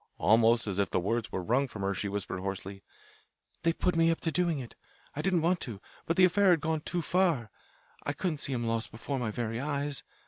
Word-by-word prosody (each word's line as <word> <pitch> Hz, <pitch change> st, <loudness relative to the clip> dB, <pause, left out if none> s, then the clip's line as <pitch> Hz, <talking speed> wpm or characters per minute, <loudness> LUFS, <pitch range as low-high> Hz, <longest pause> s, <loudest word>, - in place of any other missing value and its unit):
Almost 115 Hz, +3 st, +4 dB
as 100 Hz, -2 st, -2 dB
if 100 Hz, -, +1 dB
the -, -, +1 dB
words 115 Hz, +5 st, -1 dB
were 95 Hz, -, -3 dB
wrung 125 Hz, +8 st, +2 dB
from 105 Hz, -5 st, -7 dB
her 100 Hz, 0 st, +1 dB
she 100 Hz, +1 st, -2 dB
whispered 100 Hz, -2 st, -3 dB
hoarsely: 95 Hz, +1 st, -5 dB, 0.8 s
"They 165 Hz, -, +3 dB
put 180 Hz, +1 st, 0 dB
me 165 Hz, 0 st, +4 dB
up 165 Hz, -, +1 dB
to 165 Hz, -, 0 dB
doing 175 Hz, -2 st, +1 dB
it; 125 Hz, -3 st, -7 dB, 0.4 s
I 150 Hz, -, -2 dB
didn't 180 Hz, -2 st, +1 dB
want 175 Hz, +1 st, +2 dB
to. 110 Hz, -6 st, -3 dB, 0.3 s
But 165 Hz, -, 0 dB
the 185 Hz, -, +8 dB
affair 195 Hz, +2 st, +4 dB
had 175 Hz, -2 st, +5 dB
gone 155 Hz, +1 st, -1 dB
too 175 Hz, +2 st, -2 dB
far. 165 Hz, -, +1 dB, 0.5 s
I 145 Hz, -, -1 dB
couldn't 155 Hz, 0 st, -2 dB
see 140 Hz, -, 0 dB
him 120 Hz, -2 st, -1 dB
lost 115 Hz, 0 st, -1 dB
before 130 Hz, +5 st, -4 dB
my 120 Hz, -3 st, -1 dB
very 115 Hz, +1 st, -3 dB
eyes. 140 Hz, 0 st, -2 dB
130 Hz, 230 wpm, -30 LUFS, 110-165 Hz, 0.8 s, the